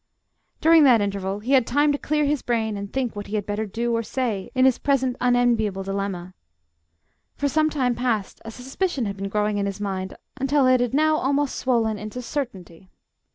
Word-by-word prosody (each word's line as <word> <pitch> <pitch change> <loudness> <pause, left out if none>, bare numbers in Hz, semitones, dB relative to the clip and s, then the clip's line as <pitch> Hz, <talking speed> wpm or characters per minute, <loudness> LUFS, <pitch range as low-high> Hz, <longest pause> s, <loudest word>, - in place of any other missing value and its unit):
During 325 0 +6
that 245 -4 +6
interval 200 0 -2
he 245 +5 -4
had 260 -4 +4
time 290 +4 +3
to 285 - 0
clear 300 0 0
his 290 -1 0
brain 225 -3 -1
and 200 0 -6
think 260 -4 -2
what 205 0 -6
he 215 - -4
had 205 -2 -1
better 210 +1 -3
do 235 +3 -1
or 230 - 0
say 230 -4 -3
in 255 0 +4
his 260 -2 +3
present 265 -3 +1
unenviable 240 -5 +2
dilemma. 195 -2 -4 1.0
For 285 - -1
some 310 +2 +2
time 260 -5 0
past 230 -5 -2
a 225 - -7
suspicion 265 +4 -3
had 200 -1 -3
been 195 0 -4
growing 210 0 0
in 200 - 0
his 200 0 -5
mind, 190 -2 -4 0.2
until 275 +1 +2
it 255 0 +4
had 245 +1 -1
now 310 +1 +3
almost 285 0 0
swollen 225 -4 0
into 215 +4 -6
certainty. 195 - -6
235 Hz, 200 wpm, -23 LUFS, 205-265 Hz, 1.0 s, During